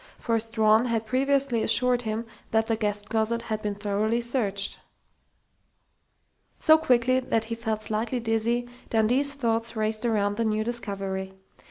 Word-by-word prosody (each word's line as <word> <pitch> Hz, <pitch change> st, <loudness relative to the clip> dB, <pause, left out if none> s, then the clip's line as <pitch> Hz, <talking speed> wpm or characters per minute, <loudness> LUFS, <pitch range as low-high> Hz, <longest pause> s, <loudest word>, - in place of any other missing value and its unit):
For 230 Hz, -1 st, 0 dB
Strawn 220 Hz, 0 st, +3 dB
had 230 Hz, -2 st, -1 dB
previously 270 Hz, 0 st, +1 dB
assured 245 Hz, +2 st, +3 dB
him 220 Hz, 0 st, -3 dB, 0.2 s
that 220 Hz, 0 st, +2 dB
the 225 Hz, 0 st, 0 dB
guest 205 Hz, -2 st, -2 dB
closet 225 Hz, +1 st, 0 dB
had 215 Hz, -2 st, -3 dB
been 210 Hz, -1 st, -3 dB
thoroughly 210 Hz, +3 st, 0 dB
searched. 220 Hz, -5 st, -1 dB, 1.8 s
So 315 Hz, 0 st, +5 dB
quickly 255 Hz, -4 st, +3 dB
that 225 Hz, -3 st, 0 dB
he 230 Hz, -, -4 dB
felt 220 Hz, -2 st, -3 dB
slightly 220 Hz, +4 st, -2 dB
dizzy, 230 Hz, +1 st, 0 dB, 0.2 s
Dundee's 250 Hz, +6 st, +2 dB
thoughts 230 Hz, -3 st, -1 dB
raced 215 Hz, 0 st, -1 dB
around 205 Hz, -3 st, 0 dB
the 230 Hz, -, 0 dB
new 215 Hz, 0 st, 0 dB
discovery. 195 Hz, -5 st, -3 dB
225 Hz, 145 wpm, -26 LUFS, 215-240 Hz, 1.8 s, So